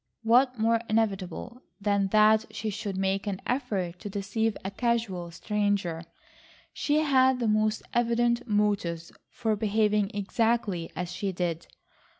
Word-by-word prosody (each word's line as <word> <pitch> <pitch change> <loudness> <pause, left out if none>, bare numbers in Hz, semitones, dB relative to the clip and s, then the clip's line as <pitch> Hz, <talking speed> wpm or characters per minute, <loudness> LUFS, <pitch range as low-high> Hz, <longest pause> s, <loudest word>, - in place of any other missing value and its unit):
What 250 +3 +4
more 225 +1 +2
inevitable 215 +2 -1 0.2
than 200 -1 +1
that 215 +2 +4
she 215 -1 -4
should 205 -1 -4
make 195 +1 0
an 195 -2 -2
effort 200 -9 -2
to 205 - -6
deceive 205 +3 -1
a 195 - -2
casual 215 -6 -1
stranger? 195 -2 -1 0.7
She 300 0 +1
had 260 -3 +4
the 235 - 0
most 215 0 +1
evident 235 +1 +1
motives 205 -6 0 0.2
for 220 -1 -1
behaving 210 -1 +1
exactly 205 -3 0
as 180 -1 -4
she 195 +2 -2
did. 170 -2 -3
210 Hz, 135 wpm, -28 LUFS, 195-230 Hz, 0.7 s, What